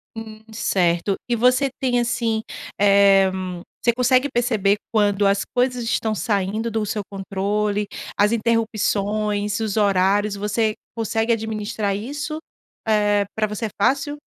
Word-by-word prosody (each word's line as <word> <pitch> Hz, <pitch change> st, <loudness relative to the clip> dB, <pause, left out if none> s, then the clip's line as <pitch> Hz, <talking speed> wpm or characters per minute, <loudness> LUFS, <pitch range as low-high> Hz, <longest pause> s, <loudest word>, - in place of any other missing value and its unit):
Hum, 220 Hz, -1 st, -9 dB
certo. 180 Hz, -2 st, +1 dB
E 240 Hz, -, +1 dB
você 255 Hz, +4 st, +3 dB
tem, 245 Hz, -2 st, +2 dB
assim, 230 Hz, -2 st, 0 dB, 0.4 s
eh, 195 Hz, -1 st, +5 dB, 0.5 s
você 240 Hz, -, +4 dB
consegue 255 Hz, +2 st, +3 dB
perceber 215 Hz, -5 st, +1 dB, 0.2 s
quando 205 Hz, -2 st, +2 dB
as 200 Hz, 0 st, +3 dB
coisas 250 Hz, 0 st, +1 dB
estão 225 Hz, -1 st, 0 dB
saindo 210 Hz, +1 st, -1 dB
do 220 Hz, -1 st, -1 dB
seu 210 Hz, 0 st, -2 dB
controle? 200 Hz, +1 st, -1 dB, 0.3 s
As 205 Hz, +2 st, +3 dB
interrupções, 215 Hz, -2 st, 0 dB
os 220 Hz, -3 st, -2 dB
horários, 200 Hz, 0 st, +2 dB
você 210 Hz, +2 st, 0 dB, 0.2 s
consegue 225 Hz, 0 st, 0 dB
administrar 215 Hz, -2 st, -2 dB
isso? 285 Hz, +8 st, -4 dB, 0.5 s
Eh, 205 Hz, -1 st, +2 dB
pra 215 Hz, -1 st, +1 dB
você 210 Hz, +2 st, -4 dB
é -, -, -3 dB
fácil? 280 Hz, +4 st, +1 dB
215 Hz, 130 wpm, -22 LUFS, 205-230 Hz, 0.5 s, eh